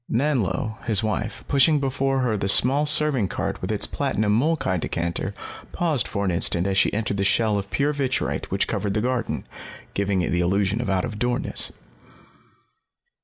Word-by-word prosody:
Nanlo, 110 - 0
his 110 -2 +2
wife, 110 0 -3
pushing 145 +2 +4
before 135 0 0
her 120 -4 +1
the 100 -1 -2
small 140 +8 +3
serving 150 -8 +5
cart - - -4
with - - -3
its - - 0
platinum 105 0 0
molkai 130 - +1
decanter, 85 +1 -3 0.4
paused 160 -8 0
for 100 -1 -2
an 95 - +1
instant 85 +1 +1
as 100 -1 0
she 95 - +3
entered 105 -1 -2
the 100 - 0
shell 110 +2 +2
of 100 0 -7
pure 145 +2 0
vitrite 135 -3 -2
which - - 0
covered 100 -1 -2
the 105 - +1
garden, 125 -1 -2 0.5
giving 100 -2 0
it - - -2
the 85 - +1
illusion 100 +5 +1
of 120 - -3
out 95 -1 +1
of 105 -2 -6
doorness. 120 0 -1
110 Hz, 175 wpm, -23 LUFS, 100-135 Hz, 0.5 s, serving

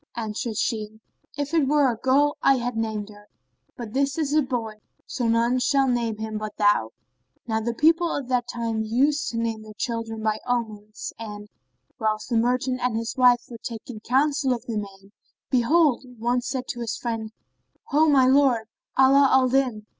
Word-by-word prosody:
Answered 220 0 -4
she, 215 -1 -2 0.4
"If 290 +1 -3
it 315 -5 +3
were 285 -2 +3
a - - -4
girl 280 +5 +2
I 275 - +5
had 245 -1 -3
named 220 -2 -3
her; 205 0 -15 0.5
but 230 -3 -7
this 275 +1 0
is 300 -3 -1
a 305 - +4
boy, 230 -5 -4 0.2
so 245 -3 -2
none 235 +2 +2
shall 270 +2 +2
name 235 -3 0
him 220 0 -4
but 215 -1 -6
thou." 205 - +3 0.6
Now 220 -1 -1
the 235 +1 -2
people 330 +5 +3
of 275 -3 -3
that 250 -2 0
time 230 -2 -2
used 270 +7 +1
to 230 - -5
name 225 -1 -2
their 215 -1 -12
children 225 -2 -4
by 215 0 0
omens; 215 -3 -4
and, 210 -2 -8 0.5
whilst 215 +1 -1
the 235 - +2
merchant 250 +2 +1
and 250 -3 0
his 230 0 -4
wife 245 -2 +5
were 235 -2 -10
taking 230 0 -7
counsel 270 +3 +1
of 240 - -6
the 225 -2 -3
name, 195 -1 -8 0.4
behold, 270 +2 +3
one 240 +2 0
said 260 +1 -4
to 240 - -4
his 235 -2 -3
friend, 225 -2 -4 0.6
"Ho 305 +3 +4
my 270 -3 +5
lord, 260 -4 +3 0.3
Ala 270 +1 +6
al 260 -1 +4
Din!" 250 -5 0
235 Hz, 185 wpm, -24 LUFS, 220-265 Hz, 0.6 s, Ala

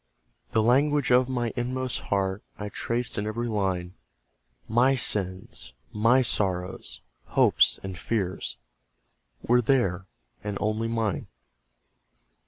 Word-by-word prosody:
The 110 - +2
language 140 +3 +3
of 125 +1 +5
my 120 -3 -1
inmost 125 +1 -2
heart 95 0 0 0.2
I 105 0 -5
traced 115 +2 -2
in 105 - -2
every 120 +3 -2
line; 95 -5 -1 0.7
MY 125 +4 +4
sins, 95 -6 -1 0.2
MY 115 +5 +4
sorrows, 95 -5 -1 0.2
hopes, - - +3
and 95 -3 -6
fears, 95 -4 -2 0.9
Were 125 +1 +4
there 95 -8 +1 0.4
and 105 -1 -3
only 110 +2 0
mine. 115 -4 -1
110 Hz, 110 wpm, -26 LUFS, 95-125 Hz, 0.9 s, of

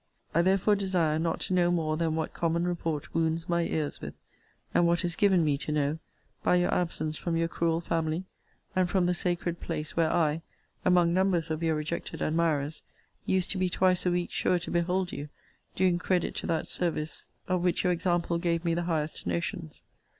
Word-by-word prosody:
I 170 - +4
therefore 195 +3 +3
desire 180 -6 +1
not 165 0 -1
to - - -1
know 175 -1 +4
more 160 -3 +1
than 160 -1 0
what 160 -1 -2
common 170 +1 0
report 165 -4 -3
wounds 165 +1 0
my 170 0 +2
ears 155 -3 -2
with; - - -7 0.6
and 175 - +4
what 170 +1 +2
is 175 -2 0
given 190 -4 +4
me 145 -2 +1
to 150 - -2
know, 150 +1 0 0.4
by - - +3
your 175 0 +2
absence 155 -3 -1
from 170 -2 -1
your 165 0 +1
cruel 165 0 0
family, 165 0 -1 0.5
and 185 -1 +2
from 185 -1 +2
the 180 - +2
sacred 175 -1 -2
place, 155 -2 -4
where 165 -2 +2
I, 160 -1 +2 0.4
among 175 -2 +4
numbers 185 -3 +2
of 155 +1 -2
your 165 -1 +1
rejected 155 +2 -4
admirers, 155 -2 0 0.5
used 185 -1 +1
to 190 - -2
be 185 -1 +2
twice 185 0 +2
a 180 - +2
week 175 0 -1
sure 180 - +2
to 170 - -5
behold 180 +1 0
you 145 +1 -6 0.5
doing 180 -2 +2
credit 180 -1 0
to - - -3
that 165 0 0
service 160 -3 -3 0.2
of 185 -1 +1
which 180 -1 +1
your 180 -1 +3
example 175 -1 0
gave 170 -1 0
me 170 - +2
the 170 - 0
highest 155 - -2
notions. 85 -2 -3
170 Hz, 195 wpm, -29 LUFS, 160-180 Hz, 0.6 s, I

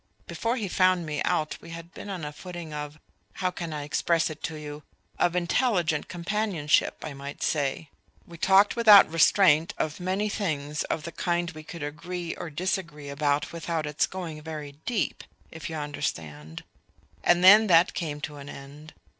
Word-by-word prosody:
Before 230 +1 -2
he 220 -6 -3
found 185 -1 +2
me 150 -1 -3
out 155 -1 0
we 170 - -12
had 165 0 -9
been - - -9
on 180 -6 -4
a 150 - -6
footing 175 -2 -8
of 150 0 -6 0.4
how 185 -1 -1
can 170 -2 -5
I 150 -1 -4
express 160 +2 +1
it 155 - -10
to 160 - -5
you? 150 -1 -7 0.4
of 175 - +2
intelligent 175 - +1
companionship, 175 -3 0
I 150 - -5
might 140 +1 -7
say. 145 +1 -1 0.3
We 170 -1 -13
talked 195 +3 +5
without 215 -4 +8
restraint 165 -1 +4
of 155 +2 -2
many 190 +4 -1
things 150 -8 -2
of 155 - -3
the 170 - -6
kind 175 +1 -1
we 155 -1 -10
could 160 0 -8
agree 170 +4 -5
or 175 - -6
disagree 165 -3 -3
about 145 +1 0
without 165 -1 -2
its 150 +1 0
going 170 -5 -6
very 150 -2 -6 0.2
deep... 235 -5 -1 0.3
if 160 +3 -7
you 160 - -5
understand. 80 - -5 0.6
And 175 0 +4
then 210 +4 +9
that 170 -1 +5
came 150 -4 -4
to 150 0 -6
an 140 0 -9
end. 145 +3 -11
165 Hz, 175 wpm, -27 LUFS, 150-180 Hz, 0.6 s, then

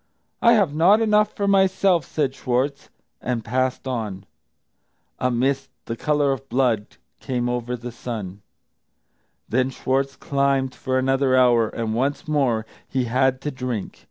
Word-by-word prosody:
"I 235 - +6
have 200 -10 +3
not 180 +8 +5
enough 210 -1 +3
for 200 - -2
myself," 190 -4 +3
said 140 -4 -1
Schwartz, 135 +2 -2 0.3
and 120 -3 -2
passed 130 +2 -1
on. 105 -6 -4 0.9
A 125 - +1
mist, 135 +3 0
of - - -52
the 115 - -4
colour 145 +2 +1
of 135 0 -5
blood, 120 -4 0 0.2
came 125 -2 -2
over 120 0 -2
the 120 0 -7
sun. 105 -5 -6 1.1
Then 130 +3 +1
Schwartz 135 +1 -1
climbed 140 -2 0
for 130 -1 -2
another 130 0 +2
hour, 120 -3 +4
and 115 -1 -3
once 140 +8 -1
more 130 -7 +1 0.2
he 130 -2 -1
had 130 +2 +1
to 150 - -3
drink. 125 -6 -5
130 Hz, 150 wpm, -23 LUFS, 120-140 Hz, 1.1 s, I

